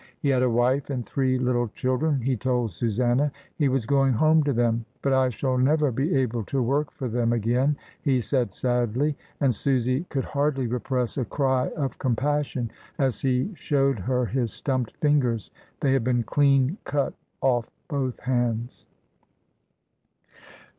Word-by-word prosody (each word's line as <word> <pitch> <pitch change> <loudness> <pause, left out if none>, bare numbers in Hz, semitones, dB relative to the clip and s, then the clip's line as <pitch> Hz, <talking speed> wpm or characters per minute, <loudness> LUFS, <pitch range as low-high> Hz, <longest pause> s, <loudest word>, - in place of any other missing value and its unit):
He 140 - 0
had 130 -2 +3
a 125 - +3
wife 125 +4 +1
and 125 -4 -3
three 130 -2 0
little 125 -1 +1
children, 130 +5 0
he 130 +2 0
told 125 -1 0
Susanna. 120 - +1 0.2
He 145 -4 +2
was 130 -3 0
going 135 +1 +3
home 155 +6 +4
to 145 - +2
them, 115 -2 +1 0.2
"but 135 - +2
I 130 -1 +3
shall 130 +2 -1
never 145 +2 +3
be 135 +7 0
able 120 -4 0
to 135 - -1
work 140 +4 +1
for 130 - -5
them 120 0 0
again," 120 +5 +1 0.2
he 135 -4 +2
said 125 0 0
sadly, 125 +4 0 0.3
and 135 -3 +3
Susy 130 - 0
could 135 -3 -1
hardly 140 -2 0
repress 125 +1 -2
a 125 - -1
cry 130 +1 +1
of 135 -5 -3
compassion 135 -1 -1 0.3
as 130 -6 0
he 130 +7 +1
showed 140 - +1
her 125 +6 0
his 120 -2 -1
stumped 130 -1 -2
fingers 130 -8 +1
— - - -35
they 135 -2 +3
had 135 -3 +2
been 120 -1 +1
clean 140 - +2
cut 145 -1 -1 0.3
off 120 -3 +2 0.2
both 135 -5 -2
hands. 120 -2 -2
130 Hz, 160 wpm, -25 LUFS, 120-140 Hz, 0.3 s, home